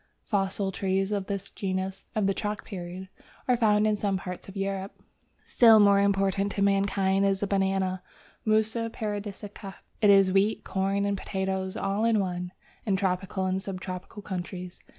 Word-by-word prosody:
Fossil 195 -1 -1
trees 195 +1 0
of 200 -2 -1
this 200 0 -4
genus 190 0 -3
(of 215 -2 +1
the 195 - +2
chalk 210 +1 -4
period) 185 0 -7 0.4
are 250 - +4
found 215 -3 +3
in 215 -1 +3
some 200 -2 0
parts 180 +1 -7
of 195 - -9
Europe. 195 0 -3 0.5
Still 225 -3 +7
more 200 -1 +6
important 195 0 +1
to 200 - 0
mankind 195 -1 +2
is 195 -1 +1
the - - +1
Banana 190 -2 0 0.4
(Musa 220 +1 +1
paradisiaca). 205 -2 -6 0.3
It 210 - +5
is 195 -1 +6
wheat, 200 +3 +2
corn, 195 +1 0
and 200 0 0
potatoes 190 0 -3
all 195 +2 -1
in 230 -2 +3
one, 180 -2 -3 0.3
in 200 -3 +1
tropical 190 0 -1
and 185 +1 0
sub 190 -2 -5
tropical 185 +3 -7
countries. 180 -1 -6
195 Hz, 165 wpm, -27 LUFS, 190-205 Hz, 0.5 s, Still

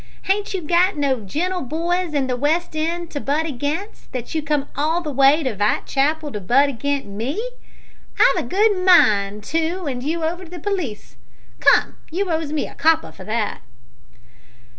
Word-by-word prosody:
Hain't 400 +1 0
you 365 - -3
got 345 +2 +2
no 275 -3 +1
genteel 345 - -2
boys 335 +4 -1
in 275 -2 +2
the 255 -1 -1
West 310 +6 0
end 335 +2 -2
to 290 - -3
butt 295 +3 0
agin, 295 +6 -2 0.3
that 245 -2 -5
you 315 - 0
come 295 -2 -1
all 315 +4 +1
the 305 -3 -4
way 275 +3 +4
to 255 -5 -2
Vitechapel 285 +9 0
to 210 - -4
butt 270 +9 +3
agin 275 -5 -3
me? 295 - -3 0.7
I've - - +4
a - - -10
good 400 -1 +2
mind 210 - +4
to 330 - -1
'and 255 -4 -3
you 320 +5 -2
over 345 +3 -2
to - - -14
the 355 - -8
p'leece. 325 - -4 0.4
Come, - - +4
you 365 +2 -2
owes 320 -2 -1
me 310 - -1
a - - -12
copper 320 +2 +2
for - - -12
that." 215 -1 -2
310 Hz, 180 wpm, -21 LUFS, 270-345 Hz, 0.7 s, way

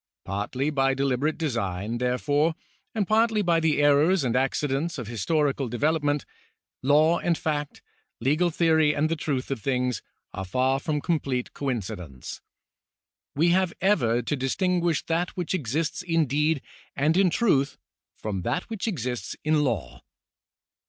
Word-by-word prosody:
Partly 115 +9 -2
by 135 -2 +2
deliberate 135 +3 0
design, 115 - -2
therefore, 145 +6 +1 0.4
and 205 -4 0
partly 220 -1 +3
by 170 -2 +3
the 160 -2 +2
errors 145 +4 +4
and 125 -2 0
accidents 140 +4 0
of 125 - -4
historical 135 +5 0
development, 145 +3 0 0.6
law 155 +5 +4
and 170 -2 +1
fact, 150 -2 -3 0.4
legal 150 +8 +2
theory 160 -2 +3
and 155 +2 +1
the 165 - +1
truth 140 -4 -2
of 130 -5 -2
things, 125 -3 0 0.3
are 95 - -4
far 130 +8 +1
from 150 0 -2
com 165 0 +1
plete 125 -3 -3
coincidence. 100 - -5 0.9
We 165 +5 +3
have 185 0 +2
ever 120 - +2
to 145 - -1
distinguish 170 +5 0
that 170 +3 -1
which 175 -1 -2
exists 155 +1 -1
in 165 -3 +1
deed 150 +2 +1 0.3
and 150 +4 +2
in 190 0 +4
truth, 145 -9 +2 0.4
from 100 -3 -3
that 120 - -2
which 220 0 -3
exists 125 - -3
in 155 -1 +2
law. 110 - -2
145 Hz, 145 wpm, -26 LUFS, 125-165 Hz, 0.9 s, errors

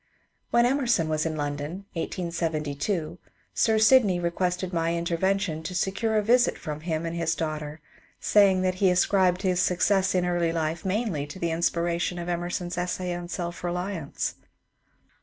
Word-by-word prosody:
When 235 0 +4
Emerson 245 - +2
was 155 +1 0
in 160 - -3
London 145 +5 -4
(1872) 165 0 -2 0.3
Sir 220 -1 +3
Sydney 215 -4 +5
re 170 -1 -1
quested 180 +1 -2
my 165 0 0
intervention 170 0 0
to 180 +3 -6
secure 215 +4 0
a 210 - +2
visit 245 +3 +3
from 150 -2 -5
him 160 0 -2
and 165 0 -3
his 165 -1 0
daughter, 155 -1 -4 0.4
saying 195 -3 +4
that 185 0 +1
he 190 - +5
ascribed 185 0 +2
his 180 -2 +1
success 190 +2 +2
in 180 - +2 0.3
life 160 0 -2
mainly 190 -7 -1
to 145 - -9
the 170 -2 -1
inspiration 170 +1 0
of 175 0 -4
Emerson's 175 0 -2
essay 180 0 -2
on 175 0 -5
'^ - - -20
Self 175 -1 -4
Beliance." 180 -3 -3
175 Hz, 160 wpm, -26 LUFS, 165-190 Hz, 0.4 s, Sydney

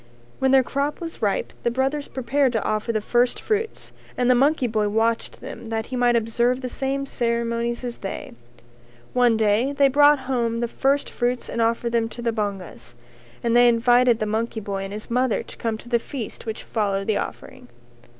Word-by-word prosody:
When 265 - +2
their 265 0 +6
crop 280 +3 -2
was 330 -6 -7
ripe 205 -3 0
the - - +1
brothers 270 +4 -1
prepared 265 +1 0
to 225 - 0
offer 215 +2 -1
the 215 -2 -1
first 240 +3 +1
fruits 445 +1 -3 0.3
and 250 0 +3
the - - +7
monkey 275 +2 +3
boy 215 -3 0
watched 225 +2 0
them - - -8
that 225 -1 -2
he 255 - -6
might 245 -1 +3
observe 235 +3 +1
the 255 - -4
same 275 +2 -2
ceremonies 235 -1 -1
as 240 -1 -4
they. 195 - -6 0.8
One 245 -2 +4
day 220 +5 +2
they 280 -1 +4
brought 290 +1 +5
home 235 -3 -1
the 235 - 0
first 275 +4 +1
fruits 245 0 -1
and 230 - -2
offered 230 +1 +1
them 230 -1 +1
to 240 +1 -8
the 235 - +1
bongas, 200 - -5 0.5
and 235 0 +1
they 245 0 +7
invited 240 0 +4
the 215 - -2
monkey 220 +2 -2
boy 195 -2 -4
and 195 - -7
his 215 +3 -7
mother 250 -1 +1
to - - -12
come 225 -1 -2
to 230 - -14
the 235 -1 +3
feast 235 -2 -7
which 220 - -4
followed 200 -3 -1
the 215 - +1
offering. - - -7
235 Hz, 200 wpm, -23 LUFS, 225-260 Hz, 0.8 s, the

